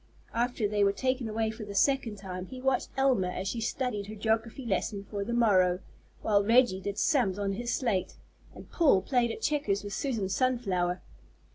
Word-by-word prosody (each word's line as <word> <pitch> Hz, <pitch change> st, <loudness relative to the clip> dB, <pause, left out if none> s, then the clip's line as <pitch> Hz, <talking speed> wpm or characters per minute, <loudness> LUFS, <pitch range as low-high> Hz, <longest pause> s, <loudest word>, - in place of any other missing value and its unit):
After 240 Hz, -2 st, 0 dB
they 205 Hz, 0 st, +1 dB
were 200 Hz, 0 st, +3 dB
taken 255 Hz, 0 st, -1 dB
away 220 Hz, 0 st, -1 dB
for 220 Hz, 0 st, -8 dB
the 205 Hz, -1 st, -7 dB
second 265 Hz, -3 st, +2 dB
time, 185 Hz, -2 st, -7 dB
he 255 Hz, -, -8 dB
watched 265 Hz, 0 st, 0 dB
Elma 260 Hz, -9 st, +3 dB
as 185 Hz, +1 st, -4 dB
she 230 Hz, +4 st, -2 dB
studied 225 Hz, -3 st, -2 dB
her 215 Hz, -, -7 dB
geography 225 Hz, +4 st, -1 dB
lesson 200 Hz, -1 st, -1 dB
for 200 Hz, 0 st, -4 dB
the 225 Hz, -, -4 dB
morrow, 190 Hz, -7 st, +4 dB, 0.5 s
while 205 Hz, -2 st, +3 dB
Reggie 230 Hz, -3 st, +4 dB
did 200 Hz, +1 st, -4 dB
sums 240 Hz, -, +2 dB
on 200 Hz, -1 st, -1 dB
his 240 Hz, +4 st, -3 dB
slate, 220 Hz, -8 st, -1 dB, 0.4 s
and -, -, -12 dB
Paul 280 Hz, -, +4 dB
played 245 Hz, -3 st, +2 dB
at 225 Hz, -, -6 dB
checkers 215 Hz, -10 st, 0 dB
with 205 Hz, -1 st, -6 dB
Susan 230 Hz, -7 st, -1 dB
Sunflower. 190 Hz, -5 st, 0 dB
220 Hz, 185 wpm, -29 LUFS, 195-245 Hz, 0.5 s, morrow